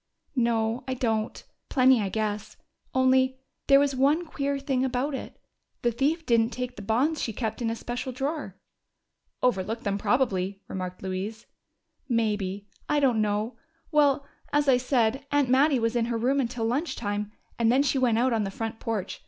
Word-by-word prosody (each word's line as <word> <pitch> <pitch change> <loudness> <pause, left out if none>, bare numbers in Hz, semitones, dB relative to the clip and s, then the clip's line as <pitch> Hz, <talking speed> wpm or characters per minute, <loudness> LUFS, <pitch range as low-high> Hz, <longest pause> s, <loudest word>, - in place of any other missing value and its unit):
"No, 230 -1 +1
I 260 - -1
don't. 220 -3 -1 0.3
Plenty, 255 -3 +5
I 200 - -1
guess. 210 0 -3 0.3
Only, 260 0 +3 0.3
there 275 0 +7
was 280 -1 +1
one 290 +6 +3
queer 280 -3 -2
thing 270 -2 0
about 265 +3 -1
it: 270 - -6 0.4
the 240 - +3
thief 295 +8 0
didn't 230 -3 +3
take 250 0 -5
the 210 - -8
bonds 250 +10 +1
she 225 - -1
kept 220 +1 -3
in 230 - 0
a 225 - -1
special 245 +3 -4
drawer." 280 +5 -4 0.9
"Overlooked 225 -1 0
them, 200 0 -1
probably," 200 -6 +1
remarked 185 -1 -5
Mary 190 - -3
Louise. 220 +1 -9 0.6
"Maybe. 205 -4 -1 0.2
I 295 - +3
don't 250 -6 +3
know. 210 +3 -1 0.3
Well, 285 -2 +3 0.3
as 295 0 +2
I 260 -2 +6
said, 250 0 +1
Aunt 285 -3 +2
Mattie 275 +2 +4
was 230 0 0
in 235 -1 +2
her 235 0 -1
room 260 +5 +1
until 240 -3 -1
lunch 275 +9 -1
time, 205 -1 -3 0.3
and 230 0 +4
then 265 +3 +4
she 275 -1 +1
went 240 -3 +3
out 250 +1 +2
on 220 -2 +1
the 195 - -2
front 225 +2 -5
porch. 215 -4 -3
240 Hz, 180 wpm, -27 LUFS, 220-270 Hz, 0.9 s, there